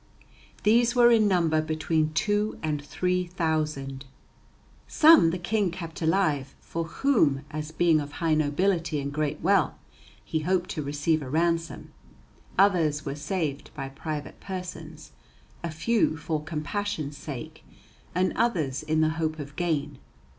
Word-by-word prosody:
These 235 +3 +4
were 240 -1 +6
in 220 -2 +5
number 165 -5 +2
between 155 0 0
two 205 +5 0
and 150 -2 -1
three 180 +4 -1
thousand. 155 -6 -2 0.8
Some 310 - +7
the 175 - -2
King 195 +2 0
kept 165 -1 -7
alive, 160 -5 +1
for 165 0 -4
whom, 160 - +1
as 155 0 -4
being 160 -1 +3
of 145 0 -8
high 165 0 0
nobility 155 +2 +1
and 140 0 -4
great 150 0 -2
wealth, 190 -3 +3 0.5
he 160 - -1
hoped 180 +3 0
to 155 - -3
receive 145 +2 0
a 135 - -6
ransom; 165 +2 -1 0.7
others 170 -6 +3
were 140 - -2
saved 145 -1 -3
by 135 -2 -5
private 150 +2 -6
persons, 185 -2 -7 0.5
a 170 - -2
few 160 +2 +1
for 155 -1 -3
compassion's 155 0 -3
sake; 155 +2 -8 0.5
and 185 +1 +2
others 160 - 0
in 155 0 0
the 155 - +3
hope 155 0 -1
of 145 -1 -8
gain. 150 -5 -1
160 Hz, 140 wpm, -27 LUFS, 150-180 Hz, 0.8 s, Some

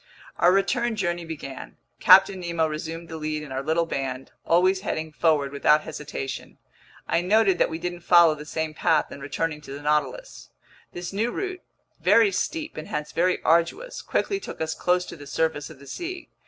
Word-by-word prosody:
Our 175 - +6
return 230 +5 +1
journey 175 -4 -2
began. 145 -4 -8 0.2
Captain 190 +1 +7
Nemo 170 -2 0
resumed 160 +2 -5
the 160 - -7
lead 155 0 -3
in 145 - -10
our 130 0 -2
little 160 +4 +1
band, 135 -4 -4
always 185 +3 +3
heading 160 -5 -3
forward 150 -3 +1
without 150 +2 +4
hesitation. 140 -4 -6 0.5
I 170 - +2
noted 195 0 +3
that - - +3
we 160 - -4
didn't 175 +1 -4
follow 170 -2 +6
the 150 0 -8
same 155 +1 -3
path 155 0 +1
in - - -8
returning 150 +2 -3
to 135 - -9
the 140 - -7
Nautilus. 150 - -2 0.4
This 175 +1 -6
new 220 +4 0
route, 370 +6 -4 0.4
very 225 -3 +5
steep 315 - -3
and 155 - -6
hence 150 0 -4
very 180 +2 +1
arduous, 170 - +1
quickly 395 -1 -1
took - - -8
us 160 0 -1
close 180 +1 +1
to - - -9
the 145 -3 -11
surface 155 0 -1
of 160 - -12
the 140 - -15
sea. 350 - -6
165 Hz, 185 wpm, -25 LUFS, 150-185 Hz, 0.5 s, Captain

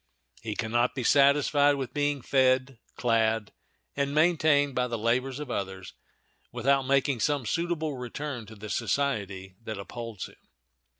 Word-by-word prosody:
He 110 -2 -4
can 110 0 -3
not 120 +1 +2
be 130 - -3
satisfied 145 +2 +4
with 135 -2 -5
being 145 -2 0
fed, 130 -1 +2 0.2
clad, 110 -3 +1 0.4
and 140 0 -1
maintained 155 -3 +3
by 125 0 0
the 120 -1 -3
labors 125 +4 0
of 150 -4 -6
others, 95 -3 -4 0.6
without 135 +2 +1
making 135 -1 +2
some 145 0 0
suitable 165 +1 -1
return 125 -1 -5
to 110 - -11
the 105 0 -8
society 100 -9 -2
that 110 -2 -6
upholds 115 0 -6
him. - - -20
130 Hz, 145 wpm, -28 LUFS, 115-140 Hz, 0.6 s, satisfied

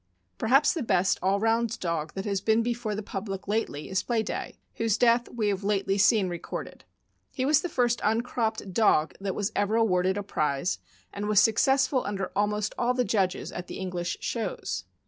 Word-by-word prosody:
Perhaps 270 +6 +4
the 330 - -3
best 190 -5 +2
all 195 +2 +2
round 225 +1 +1
dog 165 -3 -2
that 195 - -4
has 200 -2 -1
been 220 +2 +2
before 235 -2 -2
the 210 - -4
public 195 -1 -5
lately 205 -8 -2
is 190 0 0
Playday, 225 -3 -2 0.2
whose 225 -2 +1
death 240 0 +3
we 220 -3 -1
have 200 0 -2
lately 195 -1 0
seen 200 0 +4
recorded. 175 -1 -6 0.5
He 260 - -2
was 300 +1 +4
the 355 - -3
lirst 240 -4 +1
uncropped 220 -2 -1
dog 170 -7 +3
that 195 -2 -2
was 205 -1 -1
ever 205 +2 +1
awarded 190 -4 +2
a 205 - -2
prize, 150 -3 -1 0.3
and 205 +1 -4
was 210 -2 +5
successful 265 +5 +3
under 195 -2 -3
almost 210 +1 0
all 245 +1 +1
the 250 -1 +1
judges 190 -5 0
at 180 - -6
the - - -7
English 180 -2 -3
shows. 230 -2 -3
210 Hz, 185 wpm, -27 LUFS, 190-230 Hz, 0.5 s, was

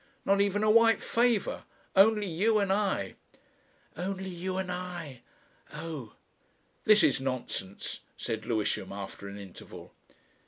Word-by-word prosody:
Not 200 +1 +4
even 200 +1 +1
a 215 - +5
white 230 0 +6
favour. 235 -3 +1 0.3
Only 210 +2 +6
you 200 +5 +2
and 200 -2 +2
I." 195 - 0 0.8
"Only 190 +2 -3
you 185 +2 -3
and 185 -1 -2
I. 175 -8 -6 0.5
Oh!" 150 -8 -6 0.7
"This 215 -1 +7
is 135 -1 +3
nonsense," 125 -7 -3 0.2
said 110 -1 -4
Lewisham, 110 -3 -1
after 100 0 -7
an 100 0 -7
interval. 100 -3 -11
180 Hz, 125 wpm, -30 LUFS, 125-205 Hz, 0.8 s, This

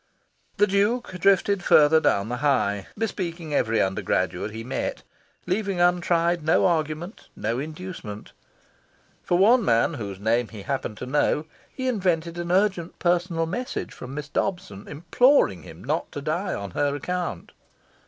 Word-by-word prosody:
The 205 - +5
Duke 210 +5 +1
drifted 195 +1 +3
further 155 +1 +6
down 100 -9 +1
the 125 - -2
High, 110 -8 +1
bespeaking 175 -7 -3
every 115 -5 +2
undergraduate 95 0 0
he 110 +1 -7
met, 125 - -3 0.4
leaving 195 -1 -1
untried 175 -1 +2
no 160 - +3
argument, 165 +2 -2
no 115 +3 -2
inducement. 155 - -7 0.9
For 175 - +1
one 230 +6 +5
man, 115 +1 +2
whose 100 -8 -6
name 115 +3 +1
he 105 -3 -10
happened 130 -5 -3
to - - -6
know, 145 +3 +1 0.3
he 260 -1 -4
invented 175 -7 0
an 175 0 -3
urgent 185 -3 +1
personal 175 -1 +1
message 245 +10 -4
from 130 +2 -9
Miss 150 0 -5
Dobson 145 - -3
imploring 160 - +3
him 80 +2 -12
not 150 +5 -2
to 145 - -5
die 175 +6 -1
on 100 -1 -6
her 145 +7 0
account. 175 - -4
160 Hz, 145 wpm, -25 LUFS, 120-180 Hz, 0.9 s, further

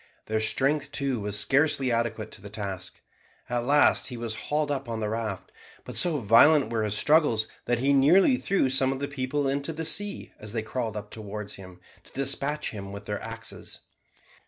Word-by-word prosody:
Their 110 0 -1
strength 140 +6 +1
too 140 -5 -1
was 105 0 +1
scarcely 140 0 +2
adequate 115 -2 -2
to - - -8
the 100 - -10
task. 100 -4 -6 0.5
At 120 -1 -1
last 145 +2 +4
he 125 -2 -6
was 115 -1 -3 0.2
hauled 150 0 0
up 135 -3 -3
on 115 -1 -3
the 105 -1 -2
raft, 110 -4 -4 0.3
but - - -8
so 170 -4 +4
violent 135 +6 +5
were 115 -1 0
his 105 -1 0
struggles, 145 -8 +3 0.2
that 120 - +1
he 135 +4 +2
nearly 175 - +5
threw 195 - +1
some 135 0 +3
of 135 - -3
the 140 +1 -3
people 140 +1 -2
into 140 +3 -2
the 160 +1 -4
sea 200 +6 +1
as 105 0 -6
they 115 -2 -2
crawled 110 -1 -4
up 105 0 -8
to 110 - -6 0.2
him 95 -2 -9 0.2
to - - -19
despatch 140 +2 0
him 100 -2 -8
with 100 0 -9
their 105 0 -4
axes. - - -5
125 Hz, 195 wpm, -26 LUFS, 110-145 Hz, 0.5 s, violent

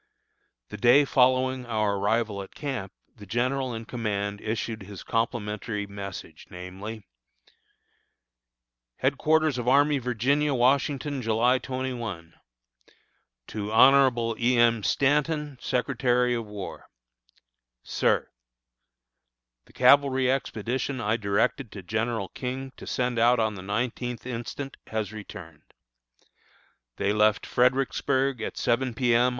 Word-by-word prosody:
The 105 - -7
day 125 +7 +5
following 130 -1 +2
our 105 -3 0
arrival 105 0 0
at 95 - -11
camp 130 -10 -4 0.3
the 105 -2 -12
general 125 +5 0
in 115 0 -6
command 100 -4 -3
issued 110 0 -3
his 100 0 -9
complimentary 105 -2 -2
message, 100 -1 -8
namely: 95 +5 -8 2.0
HEADQUARTERS 150 +1 +2
ARMY 140 +4 +3
OF 130 - -6
VIRGINIA, 135 +5 +1
Washington, 135 +2 +1
July 120 +3 +2
21. 120 -11 -5 1.1
To 105 -1 -5
Hon. 120 -1 +5
E. 120 +1 +2
M. 115 -1 +4
Stanton, 150 +3 0
Secretary 125 -1 +1
of 115 -2 -3
War: 105 -2 -8 1.0
SIR: - - +1 1.4
The - - -22
cavalry 130 0 +4
expedition 130 +1 -2
I 105 0 +1
directed 105 -1 -1
General 110 -1 -1
King 130 +1 -5
to - - -10
send 125 -2 -1
out 120 +1 +4
on 110 -1 +1
the 95 - -8
nineteenth 120 +5 -3
instant 125 +3 -6
has 110 -1 -3
returned. 85 -7 -11 1.2
They 100 - 0
left 105 0 +3
Fredericksburg 130 0 +1
at - - -5
seven 125 0 0
P. 120 0 +2
M. 120 +2 +4
120 Hz, 110 wpm, -26 LUFS, 105-130 Hz, 2.0 s, day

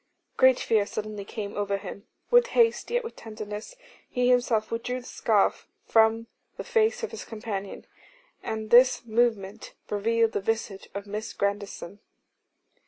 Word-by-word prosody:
Great 260 -1 +5
fear 215 -3 +2
suddenly 210 -1 -5
came 200 0 -6
over 200 -1 -1
him. 200 +2 -9 0.2
With 485 0 +6
haste, 460 -1 +3
yet 485 +1 0
with 455 - -7
tenderness, 215 - -8 0.3
he 250 -1 +1
himself 240 -3 +2
withdrew 250 +2 -3
the - - -17
scarf - - +1 0.2
from 225 0 +3 0.3
the - - -5
face 450 0 +1
of 455 - -3
his - - -7
companion, 210 -3 -6 0.6
and 220 0 -5
this 250 0 +6
movement 220 -4 -1 0.2
revealed 225 +2 +2
the - - -2
visage 215 -2 -3
of 200 0 -5
Miss 210 +2 -5
Grandison. 200 -1 -3
220 Hz, 145 wpm, -27 LUFS, 205-245 Hz, 0.6 s, With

